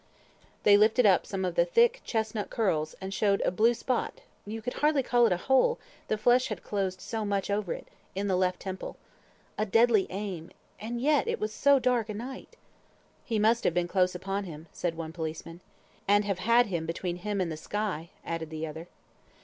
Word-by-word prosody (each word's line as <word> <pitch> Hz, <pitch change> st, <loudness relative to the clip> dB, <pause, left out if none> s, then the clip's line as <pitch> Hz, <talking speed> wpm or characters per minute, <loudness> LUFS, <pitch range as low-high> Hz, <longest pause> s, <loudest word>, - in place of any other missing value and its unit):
They 205 Hz, -1 st, +7 dB
lifted 220 Hz, +3 st, +4 dB
up 190 Hz, -3 st, +4 dB
some 190 Hz, -2 st, -2 dB
of 180 Hz, -, -1 dB
the 170 Hz, -, +4 dB
thick 475 Hz, -, +3 dB
chestnut 220 Hz, -2 st, -2 dB
curls, 160 Hz, -8 st, 0 dB
and 190 Hz, +1 st, -5 dB
showed 200 Hz, -1 st, +2 dB
a -, -, +1 dB
blue 225 Hz, +6 st, +3 dB
spot 250 Hz, +1 st, -2 dB, 0.3 s
(you 220 Hz, +2 st, -4 dB
could 245 Hz, +3 st, -4 dB
hardly 295 Hz, -2 st, +3 dB
call 240 Hz, -1 st, +4 dB
it -, -, -1 dB
a 180 Hz, -, +2 dB
hole, 265 Hz, -, +3 dB, 0.3 s
the 215 Hz, -, 0 dB
flesh 245 Hz, +4 st, +3 dB
had 215 Hz, -6 st, -5 dB
closed 190 Hz, -2 st, -2 dB
so 225 Hz, +1 st, -4 dB
much 200 Hz, -1 st, -1 dB
over 200 Hz, -3 st, -1 dB
it) -, -, -5 dB, 0.3 s
in 200 Hz, +1 st, -1 dB
the 190 Hz, -, +2 dB
left 180 Hz, 0 st, 0 dB
temple. 190 Hz, -1 st, -6 dB, 0.6 s
A 215 Hz, -, +2 dB
deadly 225 Hz, -1 st, +4 dB
aim! 185 Hz, -4 st, -5 dB, 0.3 s
And 235 Hz, +3 st, -4 dB
yet 290 Hz, +3 st, +2 dB
it -, -, -1 dB
was 215 Hz, 0 st, -2 dB
so 280 Hz, +4 st, +4 dB
dark 245 Hz, -4 st, +1 dB
a 210 Hz, -, -4 dB
night! 255 Hz, +5 st, -8 dB, 0.7 s
"He 230 Hz, -5 st, -2 dB
must 225 Hz, +2 st, +3 dB
have 170 Hz, -, +1 dB
been 175 Hz, 0 st, +1 dB
close 180 Hz, 0 st, +1 dB
upon 195 Hz, +2 st, -3 dB
him," 160 Hz, -3 st, -9 dB
said 170 Hz, -2 st, -2 dB
one 160 Hz, -1 st, -5 dB
policeman. 165 Hz, +1 st, -6 dB, 0.5 s
"And 205 Hz, +1 st, +4 dB
have 200 Hz, -2 st, -1 dB
had 235 Hz, +5 st, +4 dB
him 170 Hz, -5 st, -3 dB
between 175 Hz, +1 st, -3 dB
him 205 Hz, +2 st, -3 dB
and 175 Hz, -3 st, -1 dB
the -, -, -3 dB
sky," 180 Hz, -2 st, -3 dB, 0.2 s
added 165 Hz, -1 st, -4 dB
the 160 Hz, 0 st, -4 dB
other. 160 Hz, +2 st, -8 dB
205 Hz, 205 wpm, -29 LUFS, 180-230 Hz, 0.7 s, They